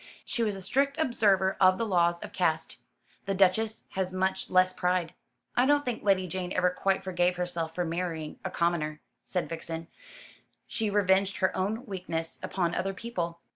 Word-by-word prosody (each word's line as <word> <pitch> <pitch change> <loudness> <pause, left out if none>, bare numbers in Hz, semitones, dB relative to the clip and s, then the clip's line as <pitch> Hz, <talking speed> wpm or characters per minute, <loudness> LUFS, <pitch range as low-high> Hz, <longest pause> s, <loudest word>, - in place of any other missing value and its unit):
She 235 - -2
was 210 -3 +1
a 195 - -8
strict 275 +8 +1
observer 200 -9 +3
of 185 0 +6
the 230 - 0
laws 175 -4 +2
of - - -8
caste. - - 0 0.5
The 195 - 0
Duchess 200 +4 +2
has 190 -1 -2
much 190 +1 -1
less 185 0 +4
pride." 180 -2 0 0.4
"I 250 +2 +4
don't 290 0 +3
think 245 -3 -2
Lady 195 -2 +3
Jane 180 0 -4
ever 180 0 +3
quite 190 +1 0
forgave 180 -1 +1
herself 170 -2 -3
for 180 - 0
marrying 165 -2 -3
a - - -2
commoner," 160 -3 0 0.3
said 180 - -1
Vixen. 165 0 -5 0.8
"She 220 -2 -1
revenged 195 -1 +3
her 185 -2 +1
own 215 +7 -1
weakness 175 -6 -4
upon 175 -3 -1
other 195 +1 -1
people." 170 -7 -4
185 Hz, 175 wpm, -29 LUFS, 175-200 Hz, 0.8 s, of